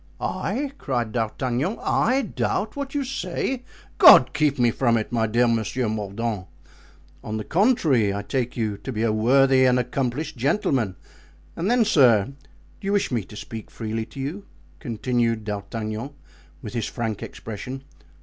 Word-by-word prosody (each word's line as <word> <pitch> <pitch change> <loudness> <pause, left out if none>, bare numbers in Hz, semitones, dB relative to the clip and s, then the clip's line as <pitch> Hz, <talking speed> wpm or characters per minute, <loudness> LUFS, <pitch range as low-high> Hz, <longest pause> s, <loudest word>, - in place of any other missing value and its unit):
"I!" 275 +2 -2
cried 120 -5 -2
D'Artagnan, 125 - -1
"I 260 +4 +1
doubt 215 -3 -2
what 280 0 -5
you 285 - +1
say! 265 0 -3 0.4
God - - +9
keep 150 -2 +1
me 120 -2 +3
from 120 -1 +2
it, 110 - -3
my 115 -2 +1
dear 120 +3 +3
Monsieur 115 +2 0
Mordaunt! 105 -1 -3 0.8
On 110 0 -4
the 110 - -4
contrary, 160 - +2
I 100 +1 -3
take 125 +2 -2
you 110 -3 -1
to 130 - -6
be 110 -2 -2
a 110 -2 +2
worthy 130 +4 +4
and 125 0 +4
accomplished 125 +3 -2
gentleman. 130 - 0 0.6
And 175 +5 -1
then, 240 -1 +4
sir, 120 - +5
do 145 +8 -20
you 200 - +1
wish 200 -7 +1
me 115 -4 0
to 105 - -13
speak 110 +1 -8
freely 110 0 -4
to - - -11
you?" 155 +10 -4 0.3
continued 115 -1 -1
D'Artagnan, 110 +3 -4 0.5
with 105 - -7
his 115 -2 -2
frank 115 -4 -3
expression. 125 +5 -7
120 Hz, 160 wpm, -24 LUFS, 110-140 Hz, 0.8 s, God